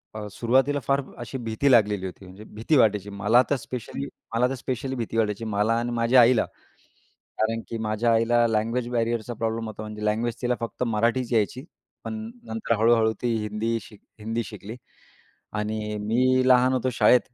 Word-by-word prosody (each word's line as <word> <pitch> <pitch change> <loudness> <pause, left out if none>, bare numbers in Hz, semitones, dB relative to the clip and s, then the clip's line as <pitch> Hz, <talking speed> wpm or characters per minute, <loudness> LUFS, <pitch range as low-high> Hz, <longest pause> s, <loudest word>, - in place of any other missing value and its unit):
अ, 105 -1 -5
सुरुवातीला 130 +6 +2
फार 140 +4 +1 0.2
अशी 120 +2 -5
भीती 120 +3 0
लागलेली 105 -5 +3
होती. 95 +1 -8
म्हणजे 95 +3 -12
भीती 115 +8 +2
वाटायची. 105 -4 +3
मला 105 +4 +3
तर 145 - +3
स्पेशली 120 - -6 0.3
मला 125 +2 +3
तर 135 - -2
स्पेशली 130 +1 -4
भीती 115 -1 -4
वाटायची. 110 0 0
मला 105 +1 +1
आणि 120 +1 -2
माझ्या 120 +2 +5
आईला. 120 -1 +4 0.9
कारण 115 +1 0
की 115 - -4
माझ्या 110 +2 0
आईला 120 +1 +3
लँग्वेज 115 +2 0
बॅरियरचा 115 -1 -1
प्रॉब्लेम 115 0 -2
होता. 110 0 -7
म्हणजे 105 0 -7
लँग्वेज 115 +2 0
तिला 125 0 +1
फक्त 115 +1 -5
मराठीच 115 +3 0
यायची. 115 +4 0 0.4
पण - - -4 0.3
नंतर 225 - -1
हळूहळू 115 0 +4
ती 120 -2 +1
हिंदी 110 +2 -1
शिक 105 -1 -15 0.2
हिंदी 115 +2 -2
शिकली 105 +1 -9 0.8
आणि 105 0 -3
मी 130 +3 +3
लहान 125 0 +5
होतो 130 0 0
शाळेत. 125 +1 +5
115 Hz, 170 wpm, -25 LUFS, 110-125 Hz, 0.9 s, माझ्या